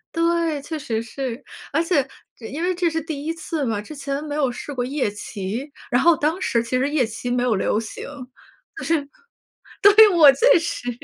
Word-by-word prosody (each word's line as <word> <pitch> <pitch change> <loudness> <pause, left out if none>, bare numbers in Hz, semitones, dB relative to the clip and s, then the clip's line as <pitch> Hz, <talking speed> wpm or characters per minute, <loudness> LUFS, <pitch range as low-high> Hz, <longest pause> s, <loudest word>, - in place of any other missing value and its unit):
对， 335 -2 +1
确 310 +2 -5
实 225 -5 -3
是。 255 +2 -5 0.3
而 320 +3 +2
且 315 -6 +1 0.3
这 230 - -12
因 305 +5 -5
为 365 +1 +1
这 350 -1 +1
是 325 0 -2
第 295 -2 -6
1 325 - -1
次 320 -2 -3
嘛， 220 -4 -1
之 215 - -10
前 280 0 -4
没 300 -1 -5
有 290 -3 +1
试 245 +4 -7
过 245 -2 -2
夜 265 -5 -1
骑。 210 +6 -5 0.2
然 245 - +3
后 340 -1 +5
当 310 +4 -1
时 235 -10 +1
其 255 +2 -1
实 270 +2 +1
夜 290 -5 +2
骑 225 +2 -6
没 245 0 +1
有 250 -2 +2
流 200 +1 0
行， 220 - -8 0.7
就 - - -6
是 300 -4 0 0.7
对， 420 +2 +9
我 305 -5 +9
确 485 - +5
实 330 -7 -3
285 Hz, 220 characters per minute, -22 LUFS, 245-325 Hz, 0.7 s, 对